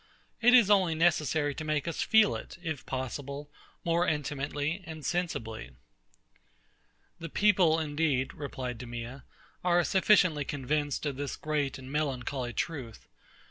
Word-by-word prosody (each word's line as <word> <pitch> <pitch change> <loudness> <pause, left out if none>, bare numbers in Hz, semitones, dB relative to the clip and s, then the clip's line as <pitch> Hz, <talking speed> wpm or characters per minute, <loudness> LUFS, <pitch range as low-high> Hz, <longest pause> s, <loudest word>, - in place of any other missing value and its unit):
It 245 +2 +7
is 225 -5 +6
only 185 -5 +4
necessary 155 -3 +2
to 155 - -6
make 155 0 -1
us 165 - -2
feel 220 -1 +5
it, - - -8
if 155 -5 -4
possible, 140 +2 -5 0.3
more 170 +1 +2
intimately 145 +3 -2
and 155 -3 -8
sensibly. 115 - -3 1.4
The 165 - -6
people, 180 -4 +4
indeed, 145 -4 0
replied 130 -4 -5
DEMEA, 120 +2 -7 0.4
are 175 -1 +4
sufficiently 185 -6 +4
convinced 145 +2 -2
of 140 -3 -2
this 145 -1 -3
great 150 -3 -1
and 130 0 -10
melancholy 135 -4 -2
truth. 130 -6 -4
150 Hz, 130 wpm, -30 LUFS, 135-165 Hz, 1.4 s, It